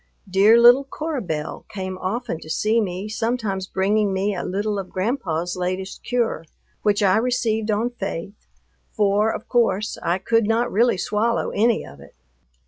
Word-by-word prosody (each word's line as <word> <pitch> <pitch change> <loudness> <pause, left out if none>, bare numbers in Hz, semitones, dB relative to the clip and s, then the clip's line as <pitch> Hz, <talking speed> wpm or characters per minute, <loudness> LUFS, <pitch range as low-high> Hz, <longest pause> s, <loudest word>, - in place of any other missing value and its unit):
Dear 200 +5 +5
little 245 +3 +7
Cora 295 +1 -4
Belle 155 -5 -4
came 190 -2 -5
often 210 -1 -3
to 155 - -12
see 215 +7 +1
me, 190 0 -3
sometimes 215 -3 -2
bringing 200 +2 +1
me 195 +2 0
a 180 - -3
little 205 +2 -2
of 185 -1 -6
Grandpa's 185 - -2
latest 185 +1 -4
cure, 235 -9 -1 0.4
which 210 0 +2
I 195 +1 +4
received 225 -2 0
on 220 +3 0
faith, 195 -3 -6 0.4
for, 210 0 +2
of - - -6
course, 215 -3 +1
I 170 +2 0
could 225 +3 +1
not 230 +2 +1
really 235 +1 +3
swallow 210 +5 0
any 225 +2 +1
of 70 - -13
it. 70 - -16
210 Hz, 160 wpm, -22 LUFS, 190-230 Hz, 0.4 s, little